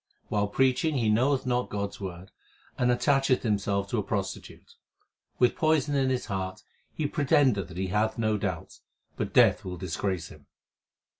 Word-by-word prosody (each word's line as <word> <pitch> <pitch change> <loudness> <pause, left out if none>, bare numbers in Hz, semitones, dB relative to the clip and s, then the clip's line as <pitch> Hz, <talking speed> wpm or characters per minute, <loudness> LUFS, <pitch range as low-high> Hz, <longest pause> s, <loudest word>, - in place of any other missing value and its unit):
While 105 0 +1
preaching 135 +7 +1
he 115 -4 +1
knoweth 130 +5 +2
not 125 0 0
God 100 -1 -2
s - - -14
word, 95 -1 -7 0.4
and 125 - +1
attacheth 130 +1 +2
himself 100 -2 0
to 120 - +1
a - - -1
prostitute. 100 -1 -5 0.6
With 125 -1 +3
poison 155 -2 +2
in 135 -2 +2
his 130 -1 -1
heart 95 -2 -4 0.3
he 155 - -3
pretendeth 140 - +2
that 90 - -11
he 95 0 -2
hath 105 +3 0
no 110 -2 +1
doubts, - - -5 0.3
but - - -3
Death - - +5
will 90 -1 -6
disgrace 90 0 -3
him. 75 -2 -16
110 Hz, 165 wpm, -27 LUFS, 95-130 Hz, 0.6 s, Death